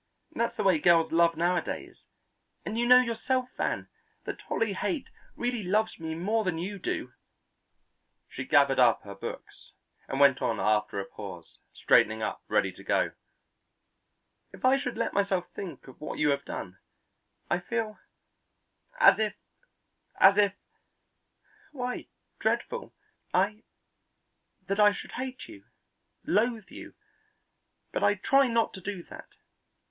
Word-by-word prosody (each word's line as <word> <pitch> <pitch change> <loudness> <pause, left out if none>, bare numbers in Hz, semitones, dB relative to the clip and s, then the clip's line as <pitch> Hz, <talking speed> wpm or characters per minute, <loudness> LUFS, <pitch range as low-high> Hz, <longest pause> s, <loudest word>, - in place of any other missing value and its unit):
That's 235 -7 -1
the - - -2
way 190 -4 +4
most 150 - -10
girls 170 -2 +5
love 165 0 +3
nowadays, 175 +1 -2 0.6
and 215 - -3
you 240 +1 +1
know 250 +1 +8
yourself, 250 +2 -1
Van, - - -2 0.4
that - - -6
Dolly 225 -3 0
Haight 285 - -2 0.3
really 240 -1 -2
loves 210 +3 0
me 160 -1 -4
more 210 +7 0
than 180 -4 -1
you 195 +4 -4
do." 125 -7 -3 1.1
She 130 - -6
gathered 140 0 +4
up 120 -2 +4
her 100 - -8
books 100 - -9 0.3
and 135 - -3
went 140 -2 +5
on 110 -3 0
after 105 -1 +1
a 100 - -3
pause, 95 -5 -10
straightening 110 +1 +3
up, - - -3
ready - - +1
to - - -14
go: - - +1 1.4
"If - - -6
I 260 +1 +6
should 250 -4 -4
let 230 - -1
myself 195 -3 0
think 185 -7 -8
of 130 - -14
what 155 - -5
you 150 - +2
have 140 0 -1
done, 90 -1 -7 0.7
I 175 - +1
feel 215 +3 -3 1.0
as - - +7
if 215 -1 0 0.8
as 195 +1 +8
if 205 -1 +3 1.2
why, 250 -3 -4 0.3
dreadful 485 0 -1 0.4
I 205 +4 +1 1.0
that 200 +1 -2
I 210 0 +6
should - - -8
hate 260 0 -6
you, 100 - -13 0.6
loathe 220 +1 0
you; - - -10 1.0
but - - -2
I 205 - +4
try 270 +7 +3
not 230 -1 +1
to 190 - -9
do 195 -1 -5
that. - - -12
195 Hz, 145 wpm, -28 LUFS, 150-230 Hz, 1.4 s, know